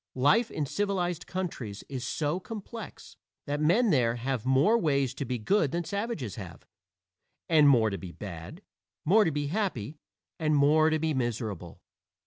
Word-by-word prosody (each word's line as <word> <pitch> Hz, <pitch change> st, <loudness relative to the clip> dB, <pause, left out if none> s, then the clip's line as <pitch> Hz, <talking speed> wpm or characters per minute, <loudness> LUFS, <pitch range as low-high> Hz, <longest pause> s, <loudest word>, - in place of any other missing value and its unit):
Life 180 Hz, -, +4 dB
in 150 Hz, -, -2 dB
civilized 180 Hz, 0 st, -2 dB
countries 150 Hz, -, -5 dB
is 130 Hz, -3 st, -5 dB
so 150 Hz, +6 st, -1 dB
complex 220 Hz, +1 st, -9 dB, 0.3 s
that 145 Hz, +1 st, -2 dB
men 195 Hz, +9 st, +3 dB
there 120 Hz, -6 st, +2 dB
have 125 Hz, 0 st, -3 dB
more 135 Hz, -, +4 dB
ways 140 Hz, -, +1 dB
to 140 Hz, -, -4 dB
be 125 Hz, 0 st, -2 dB
good 155 Hz, -, +2 dB
than 170 Hz, +2 st, -1 dB
savages 200 Hz, -, -4 dB
have, 90 Hz, -6 st, -9 dB, 0.8 s
and 155 Hz, -3 st, +6 dB
more 115 Hz, -5 st, +4 dB
to 100 Hz, -, -4 dB
be 90 Hz, -2 st, -8 dB
bad; 95 Hz, -, -9 dB, 0.4 s
more 210 Hz, +7 st, +5 dB
to 165 Hz, -, +1 dB
be 145 Hz, 0 st, -2 dB
happy, 155 Hz, -, -2 dB, 0.4 s
and 155 Hz, -2 st, +2 dB
more 150 Hz, +2 st, +5 dB
to 155 Hz, -, +2 dB
be 160 Hz, 0 st, 0 dB
miserable. 110 Hz, -, -3 dB
145 Hz, 160 wpm, -28 LUFS, 120-180 Hz, 0.8 s, and